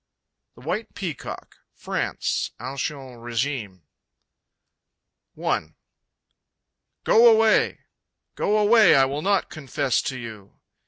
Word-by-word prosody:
The - - -16
White 220 - -4
Peacock 170 - -7 0.2
(France - - -2
Ancient 130 0 -5
Regime.) 115 - -3 1.6
I. - - -2 1.3
Go 235 +1 +6
away! 220 0 +3 0.5
Go 210 - 0
away; 215 -3 +6
I 135 -1 +5
will 140 +3 -3
not 195 +2 0
confess 140 -3 -1
to 130 - -4
you! 110 -5 -10
140 Hz, 95 wpm, -24 LUFS, 120-205 Hz, 1.6 s, Go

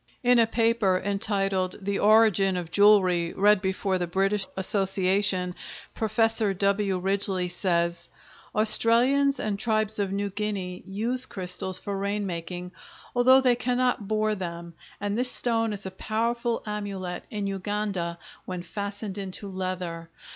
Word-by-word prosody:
In 245 0 +4
a 230 - +4
paper 225 -5 +1
entitled 195 -2 -1
"The 200 0 -3
Origin 205 -3 +3
of 170 -2 -6
Jewelry," 185 -4 +3
read 205 0 +3
before 190 0 -2
the 175 - -2
British 195 +3 0
Association, 190 -1 +1 0.4
Professor 220 -2 +1
W. 200 0 0
Ridgeley 190 -1 -1
says: 170 -2 -1 0.5
Australians 240 +6 +6
and 205 -2 -3
tribes 215 -1 0
of 200 -2 -1
New 200 0 -3
Guinea 195 -3 -4
use 235 +6 +1
crystals 185 0 -2
for 200 +1 -5
rain 200 +1 -3
making, 180 0 -6 0.4
although 260 +2 +5
they 250 -2 +3
cannot 245 -3 -1
bore 215 0 0
them, 170 -3 -7 0.3
and 205 0 -3
this 250 +2 +4
stone 225 -3 +1
is 200 -1 -1
a 190 - -5
powerful 230 +4 -2
amulet 200 -4 -5
in 205 -2 -4
Uganda 195 -3 -3 0.3
when 180 -1 -6
fastened 200 +2 -5
into 195 +1 -6
leather. 185 -3 -5
200 Hz, 135 wpm, -25 LUFS, 185-215 Hz, 0.5 s, Australians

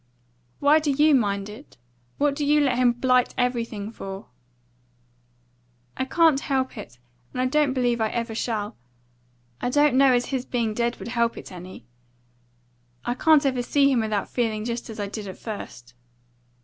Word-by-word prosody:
"Why 295 +2 +5
do 305 -1 -2
you 295 +2 +4
mind 200 -6 +1
it? 215 - -12 0.4
What 285 -1 +1
do 295 - -2
you 295 +1 +4
let 275 -4 +2
him 250 -1 +5
blight 250 +1 +1
everything 230 -4 -2
for?" 195 - -8 1.7
"I 260 - -2
can't 320 0 +3
help 265 -2 -1
it, 120 +1 -10 0.3
and - - -6
I 255 - +2
don't 285 0 +2
believe 245 -3 0
I 220 - +2
ever 230 0 -3
shall. 220 -2 -3 0.9
I - - 0
don't 290 +1 +3
know 270 0 +6
as 245 -1 +2
his 265 -2 -2
being 235 -4 -1
dead 235 +2 -1
would - - -7
help 235 -1 0
it - - -9
any. 180 -8 -10 1.2
I 240 - 0
can't 305 +2 +4
ever 260 -2 +1
see 275 +3 +3
him 255 - +2
without 215 -3 -1
feeling 220 -3 -2
just 235 0 -4
as 220 - -8
I 205 - -1
did 210 0 -6
at 190 - -8
first." 125 - -8
245 Hz, 175 wpm, -24 LUFS, 220-275 Hz, 1.7 s, know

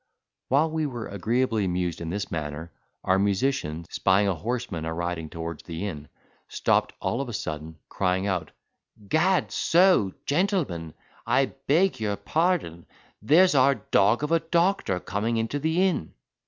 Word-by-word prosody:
While 150 +5 +2
we 160 -1 -1
were 120 -5 -5
agreeably 115 +3 0
amused 90 -2 -2
in 85 - -4
this 100 +3 -4
manner, 80 0 -5 0.3
our 95 +1 +2
musician, 100 - 0
spying 100 +2 +2
a 100 - +2
horseman 110 -2 -4
a 80 - -3
riding 85 -1 -3
towards 85 -1 -6
the 85 +3 -5
inn, 75 -7 -6 0.4
stopped - - +1
all 120 - -1
of 135 - -5
a - - -6
sudden, 80 -3 -5
crying 95 0 0
out, 90 -5 -1 0.6
"Gad 175 - +2
so! 175 - +3
gentlemen, 145 - -1 0.3
I 135 -1 +2
beg 175 +4 +3
your 105 -2 -1
pardon, 155 - -1 0.3
there's 165 - +5
our 140 0 +5
dog 110 +2 +2
of 150 - -2
a 165 - +4
doctor 170 - +1
coming 105 +6 -2
into 115 +6 -1
the 160 +5 +1
inn." 175 - -1
105 Hz, 155 wpm, -26 LUFS, -, 0.6 s, there's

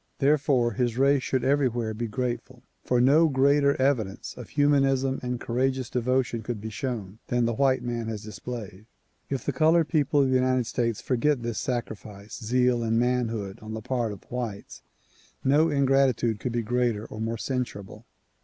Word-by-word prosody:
Therefore 140 -4 +2
his 120 +1 -1
race 140 +1 +4
should 130 -1 -1
everywhere 125 -5 +1
be 115 +2 -3
grateful, 125 +2 -4 0.2
for 125 - +1
no 150 +6 +5
greater 140 +1 +3
evidence 120 -8 -1
of 125 - -10
humanism 135 -2 +2
and 125 -1 -3
courageous 130 +1 -1
devotion 125 -1 0
could 110 0 -4
be 110 +2 -6
shown 110 -4 -5
than 120 -1 +1
the 120 - 0
white 130 +2 +2
man 120 -2 -3
has 110 -1 -5
displayed. 105 -1 -8 0.4
If 135 -4 -3
the 145 - -1
colored 160 +3 +3
people 145 -3 +2
of 135 - +1
the 130 - +2
United 130 -1 +2
States 115 -2 -1
forget 130 0 0
this 115 -1 -3
sacrifice, 110 -4 -5
zeal 125 +1 +2
and 115 0 0
manhood 115 -5 -1
on 110 0 -6
the 110 - -5
part 120 -3 -1
of 100 - -9
the - - -27
whites 120 -5 -5 0.6
no 150 +5 +4
ingratitude 135 -6 +2
could 125 - -3
be 120 -1 -1
greater 120 -2 0
or 110 - -8
more 115 +1 -2
censurable. 120 -6 -5
125 Hz, 170 wpm, -26 LUFS, 115-135 Hz, 0.6 s, no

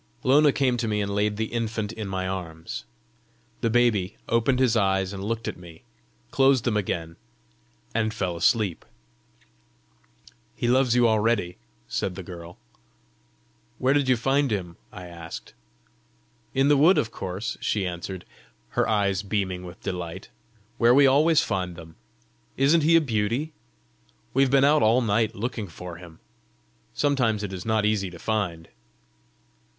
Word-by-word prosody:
Lona 145 +3 +5
came 130 -3 +1
to 115 - -2
me 105 -1 0
and 100 -1 -2
laid 105 0 0
the 110 +1 -3
infant 110 -2 -2
in 110 -3 -6
my 95 -1 -3
arms. 85 -4 -6 0.7
The 115 - 0
baby 110 -5 +2
opened 115 +3 +2
his 125 -4 +3
eyes 95 -2 +1
and 95 0 -6
looked 115 +2 -3
at - - -4
me, 85 -2 -14 0.5
closed 135 -2 +4
them 120 -4 0
again, 85 -5 -2 0.8
and 110 -1 0
fell 95 -5 -2
asleep. 95 +1 +1 1.7
"He 120 - -2
loves 125 0 +3
you 120 -1 +5
already!" 110 -5 +1 0.3
said 95 - -2
the 95 - -7
girl. 85 -1 -10 1.2
"Where 130 +1 +2
did 140 -2 +1
you 130 - +4
find 135 +3 +1
him?" 90 -6 -3 0.2
I 90 - -9
asked. 85 -1 -9 1.0
"In 135 +1 +3
the 145 0 +5
wood, 165 +7 +5
of 115 - 0
course," 95 +3 -4
she 100 -3 0
answered, 90 +1 -5 0.4
her - - 0
eyes 100 -3 +1
beaming 95 -3 -2
with 90 0 -11
delight, 85 -3 -5 0.2
" 110 +1 -35
where 120 +1 +5
we 140 0 +7
always 150 +4 +4
find 90 -4 -2
them. 80 -1 -12 0.6
Isn't 145 +5 +4
he 165 +3 +4
a 165 - +6
beauty? 120 +4 -1 0.8
We've 135 0 +3
been 135 +1 +4
out 150 +1 +4
all 115 +4 +4
night 110 -1 +1
looking 110 -1 -4
for 85 0 -9
him. 85 -2 -13 0.8
Sometimes 125 -7 +1
it 100 -2 -5
is 90 +2 -6
not 110 -1 +2
easy 105 -3 +1
to 85 - -11
find!" 90 -5 -2
110 Hz, 155 wpm, -25 LUFS, 95-125 Hz, 1.7 s, we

